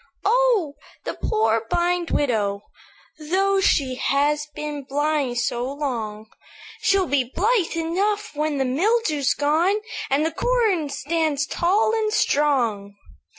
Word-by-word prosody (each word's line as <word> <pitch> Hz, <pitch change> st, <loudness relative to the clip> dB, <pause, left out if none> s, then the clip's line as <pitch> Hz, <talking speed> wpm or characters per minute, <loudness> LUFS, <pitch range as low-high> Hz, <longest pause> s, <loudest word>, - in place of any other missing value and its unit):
"'Oh! 465 Hz, -12 st, +2 dB, 0.3 s
the -, -, -3 dB
poor, 220 Hz, +1 st, 0 dB
blind 350 Hz, 0 st, 0 dB
widow, 210 Hz, -7 st, 0 dB, 0.6 s
Though 385 Hz, +5 st, +1 dB
she 270 Hz, -8 st, +2 dB
has 295 Hz, +3 st, +1 dB
been 300 Hz, -1 st, -5 dB
blind 285 Hz, -2 st, -1 dB
so 240 Hz, +2 st, -1 dB
long, 230 Hz, -7 st, -4 dB, 0.6 s
She'll 390 Hz, -1 st, +3 dB
be 285 Hz, -5 st, +1 dB
blithe 405 Hz, -2 st, +1 dB
enough 390 Hz, +6 st, -1 dB
when 300 Hz, 0 st, -1 dB
the 270 Hz, -, 0 dB
mildew's 310 Hz, -, +1 dB
gone, 315 Hz, +7 st, +2 dB, 0.3 s
And 285 Hz, +3 st, +2 dB
the 325 Hz, -, 0 dB
corn 440 Hz, -12 st, +1 dB
stands 295 Hz, 0 st, -1 dB
tall 385 Hz, +8 st, +1 dB
and 435 Hz, -1 st, 0 dB
strong.' 240 Hz, -, +1 dB
300 Hz, 120 wpm, -23 LUFS, 270-370 Hz, 0.6 s, She'll